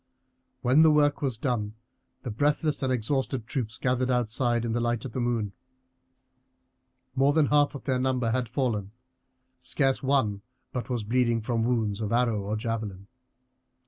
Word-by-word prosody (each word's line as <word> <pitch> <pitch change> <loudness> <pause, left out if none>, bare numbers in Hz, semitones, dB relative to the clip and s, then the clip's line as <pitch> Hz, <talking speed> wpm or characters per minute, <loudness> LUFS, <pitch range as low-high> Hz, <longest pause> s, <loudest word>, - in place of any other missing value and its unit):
When 130 +5 +5
the 160 - +7
work 145 -1 +3
was 130 -5 -1
done 110 -4 -2 0.5
the 120 - -4
breathless 145 +6 0
and 130 -1 0
exhausted 130 0 -1
troops 115 -3 -3
gathered 125 0 0
outside, 120 -1 +1
in 115 - -1
the 120 - 0
light 120 0 -1
of 130 - -5
the 130 - -4
moon. 115 -4 -1 1.6
More 135 +2 +3
than 155 -1 +4
half 145 0 +3
their 130 -2 0
number 130 -3 0
had 125 -1 -1
fallen; 115 -6 -1 0.7
scarce 135 -2 0
one 130 -8 +1 0.3
but 125 0 -4
was 120 -4 -1
bleeding 120 +1 +1
from 115 +1 -1
wounds 110 -4 0
of 105 - -2
arrow 115 -3 +2
or 100 +2 -3
javelin. 110 -4 -4
120 Hz, 155 wpm, -27 LUFS, 110-130 Hz, 1.6 s, the